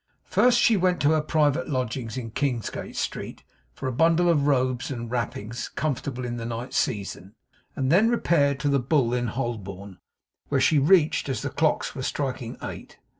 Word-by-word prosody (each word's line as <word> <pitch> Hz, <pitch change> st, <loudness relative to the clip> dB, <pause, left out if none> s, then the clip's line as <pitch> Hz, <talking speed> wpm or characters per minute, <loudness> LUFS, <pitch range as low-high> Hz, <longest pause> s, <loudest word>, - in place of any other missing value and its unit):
First, 245 Hz, -1 st, +4 dB
she 230 Hz, -2 st, +4 dB
went 180 Hz, -1 st, +2 dB
to 145 Hz, -, +4 dB
her 155 Hz, -1 st, +3 dB
private 155 Hz, +1 st, +1 dB
lodgings 125 Hz, -3 st, -3 dB
in 115 Hz, -3 st, -5 dB
Kingsgate 125 Hz, -3 st, -3 dB
Street, -, -, -4 dB, 0.3 s
for -, -, -4 dB
a -, -, 0 dB
bundle 165 Hz, +5 st, +3 dB
of 145 Hz, -4 st, +3 dB
robes 130 Hz, -3 st, +1 dB
and 120 Hz, -4 st, -5 dB
wrappings 120 Hz, -1 st, -3 dB
comfortable 135 Hz, -3 st, -3 dB
in 120 Hz, 0 st, -4 dB
the 115 Hz, -, -5 dB
night 120 Hz, +2 st, -5 dB
season; 100 Hz, -1 st, -2 dB, 0.4 s
and 130 Hz, 0 st, 0 dB
then 205 Hz, +7 st, +5 dB
repaired 145 Hz, -, +2 dB
to 145 Hz, -, 0 dB
the 140 Hz, -1 st, +3 dB
Bull 130 Hz, -2 st, +1 dB
in 120 Hz, -1 st, 0 dB
Holborn, 100 Hz, -6 st, -5 dB, 0.5 s
which -, -, +2 dB
she 155 Hz, -, +4 dB
reached 155 Hz, -1 st, +3 dB
as 130 Hz, -, -2 dB
the -, -, -3 dB
clocks -, -, 0 dB
were -, -, -6 dB
striking -, -, -3 dB
eight. -, -, -8 dB
130 Hz, 175 wpm, -25 LUFS, 120-155 Hz, 0.5 s, then